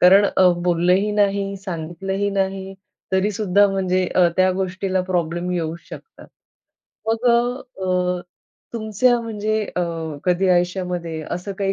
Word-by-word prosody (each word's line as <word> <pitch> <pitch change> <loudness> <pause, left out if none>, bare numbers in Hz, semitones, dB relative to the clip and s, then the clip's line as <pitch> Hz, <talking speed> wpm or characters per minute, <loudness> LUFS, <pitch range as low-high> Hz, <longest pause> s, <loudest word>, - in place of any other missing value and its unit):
कारण 195 +3 +7
अ, 185 -1 +6 0.2
बोललंही 180 +4 +2
नाही, 200 -1 +1
सांगितलं 180 0 -5
ही 205 - +1
नाही. 195 0 -2 0.4
तरीसुद्धा 205 0 +3
म्हणजे 185 -1 0
अ, 180 -1 +5
त्या 185 0 +4
गोष्टीला 185 0 -1
प्रॉब्लेम 175 0 -1
येऊ 165 -2 -2
शकतात. 450 - -12 0.8
मग 225 +2 0
अ, 190 -7 0 0.5
तुमच्या 230 +2 +2
म्हणजे 215 -1 -2
अ, - - +2 0.4
कधी 180 +1 +2
आयुष्यामध्ये 180 -2 0
असं 180 +3 -4
काही 195 -1 +1
190 Hz, 125 wpm, -21 LUFS, 180-205 Hz, 0.8 s, कारण